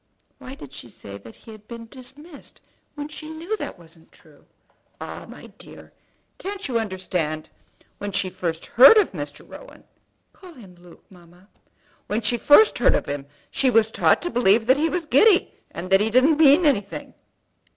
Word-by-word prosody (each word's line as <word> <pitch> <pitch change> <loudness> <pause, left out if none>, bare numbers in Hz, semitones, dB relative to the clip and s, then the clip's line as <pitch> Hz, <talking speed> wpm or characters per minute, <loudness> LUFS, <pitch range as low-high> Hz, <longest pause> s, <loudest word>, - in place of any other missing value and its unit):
"Why 260 - -10
did 140 - -13
she 130 -3 -11
say 100 -2 -11
that 110 +3 -14
he 225 - -15
had 215 -1 -15
been 230 -1 -9
dismissed 280 +6 -14 0.4
when 290 -1 -6
she 305 +1 -10
knew 330 +7 -5
that - - -6
it - - -26
wasn't 165 -1 -19
true?" - - -21 0.5
"Ah, - - -9
my - - -12
dear! - - -13 0.5
can't 395 -1 -5
you 240 -3 -1
understand? 180 -7 -4 0.5
When 205 0 -5
she 195 -1 -2
first 165 -3 -4
heard 270 - +7
of 420 - +3
Mr. 145 -4 -8
Rowan - - -14 0.3
" - - -47
"Call 370 -3 -15
him 200 -8 -15
Luke, 175 -1 -19
mamma." 175 +2 -20 0.6
"When 215 +3 -2
she 235 +2 0
first 295 - +5
heard - - +3
of - - -2
him 140 -1 -6 0.2
she 265 - +1
was 225 -2 +2
taught - - +2
to 350 - -3
believe 225 -1 +2
that 260 +3 +3
he 320 +3 0
was 355 -1 -3
giddy, 360 - +3 0.2
and 185 +2 -8
that 195 - +5
he 215 - 0
didn't 270 +7 +3
mean 310 +2 +5
anything." 205 -9 -1
225 Hz, 185 wpm, -22 LUFS, 180-295 Hz, 0.6 s, heard